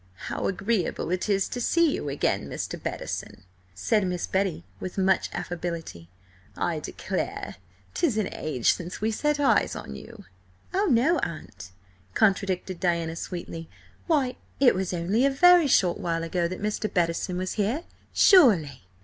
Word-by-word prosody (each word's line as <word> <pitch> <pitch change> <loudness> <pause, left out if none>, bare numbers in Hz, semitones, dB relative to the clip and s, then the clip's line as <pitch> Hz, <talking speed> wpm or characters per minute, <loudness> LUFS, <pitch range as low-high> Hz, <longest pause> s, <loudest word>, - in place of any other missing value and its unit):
"How - - -1
agreeable 195 -3 -1
it 185 +3 -1
is 195 -1 +2
to 245 - -4
see 335 +4 +3
you 145 - -3
again, 140 - -1
Mr. - - -5
Bettison!" - - -5 0.3
said 210 - +1
Miss 180 -1 -2
Betty 190 - -1 0.2
with 185 - -6
much 190 -1 +2
affability. 170 - -5 0.5
"I - - -1
declare - - -4 0.4
'tis 300 -11 +1
an 210 -3 0
age 135 -7 +1
since 175 0 -7
we 220 +1 0
set 295 +6 0
eyes 285 - +3
on 70 - -7
you!" - - -11 0.5
"Oh, 400 +3 +2
no, 275 +7 +3
Aunt," 100 - -6 0.5
contradicted 190 -2 +1
Diana 170 -3 0
sweetly. 165 -1 -6 0.4
"Why, 275 -7 +1 0.2
it 265 -2 +6
was 190 -1 -2
only 185 +7 +1
a 275 - +5
very 350 +3 +6
short 180 -9 +3
while 165 -1 -1
ago 170 +1 0
that 185 +3 -6
Mr. 210 0 -1
Bettison 175 0 0
was 185 0 -2
here, 225 +10 -1 0.3
surely!" 170 - +5
185 Hz, 150 wpm, -26 LUFS, 170-240 Hz, 0.5 s, it